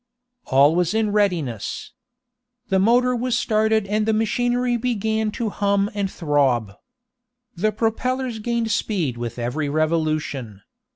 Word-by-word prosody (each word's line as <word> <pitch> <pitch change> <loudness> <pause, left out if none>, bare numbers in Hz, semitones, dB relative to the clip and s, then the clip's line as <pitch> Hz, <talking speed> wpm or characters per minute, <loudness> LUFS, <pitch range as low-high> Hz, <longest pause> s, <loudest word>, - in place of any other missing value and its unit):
All 140 +3 +4
was 180 +3 +1
in 220 -2 +1
readiness. 175 - -1 0.8
The 190 -1 +3
motor 245 +5 +3
was 240 0 0
started 220 -2 +1
and 210 +2 0
the 220 - +3
machinery 245 +2 +1
began 220 -2 -1
to 225 -2 -2
hum 200 0 +1
and 200 -2 -1
throb. 140 - +1 0.8
The 215 +5 +1
propellers 235 +2 -1
gained 235 0 -1
speed 180 - -1
with 120 0 -5
every 130 +5 -2
revolution. 155 -8 -1
205 Hz, 125 wpm, -22 LUFS, 155-225 Hz, 0.8 s, All